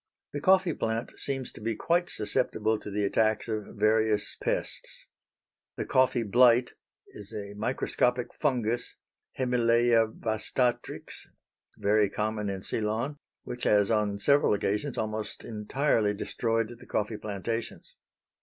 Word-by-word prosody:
The 145 - -3
coffee 185 0 +4
plant 115 -1 -2
seems 135 -2 -2
to - - -13
be 115 +1 -1
quite 175 +8 +1
susceptible 110 0 0
to - - -8
the 105 +1 -1
attacks 110 +3 +1
of 110 -2 -4
various 110 0 +2
pests. - - -2 0.7
The - - -3
coffee 130 -2 +3
blight 120 +3 +5 0.4
is 105 -1 -10
a 100 -1 -6
microscopic 125 +2 0
fungus 120 -5 -1 0.4
(Hemileia 120 -2 +3
vastatrix) 115 +3 -1 0.5
very 105 0 +3
common 105 0 -2
in 95 -1 -4
Ceylon 115 +7 -2 0.3
which 125 - -6
has 105 -1 +4
on 105 -2 +1
several 140 +1 +3
occasions 105 +7 -2
almost 110 0 -4
entirely 110 -1 0
destroyed 115 +1 -1
the - - -15
coffee 105 +1 -1
plantations. 110 +3 -5
110 Hz, 125 wpm, -28 LUFS, 105-125 Hz, 0.7 s, blight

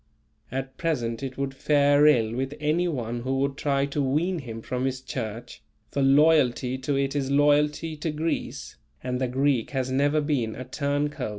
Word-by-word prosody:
At 135 +1 -5
present 120 -9 -1
it 135 -1 -5
would 135 -1 -2
fare 145 +1 +4
ill 115 -7 +3
with 135 +3 -3
any 155 +4 +1
one 120 -7 -3
who 130 +2 -2
would 140 0 0
try 140 -1 0
to 140 +1 -2
wean 160 +7 0
him 115 -5 -8
from 125 0 -2
his 130 -1 -2
Church; 115 -4 -6 0.3
for 140 - -1
loyalty 135 -3 +3
to 135 +2 -1
it 135 +1 0
is 135 -2 -1
loyalty 150 +2 +2
to 155 +2 -3
Greece, 155 +2 -3 0.3
and 125 0 -2
the 130 - +1
Greek 130 -1 +1
has 130 0 -1
never 145 +3 +2
been 140 -7 -1
a 130 - -7
turn 145 +2 -1
coat. 130 -6 -4
140 Hz, 185 wpm, -26 LUFS, 130-150 Hz, 0.3 s, fare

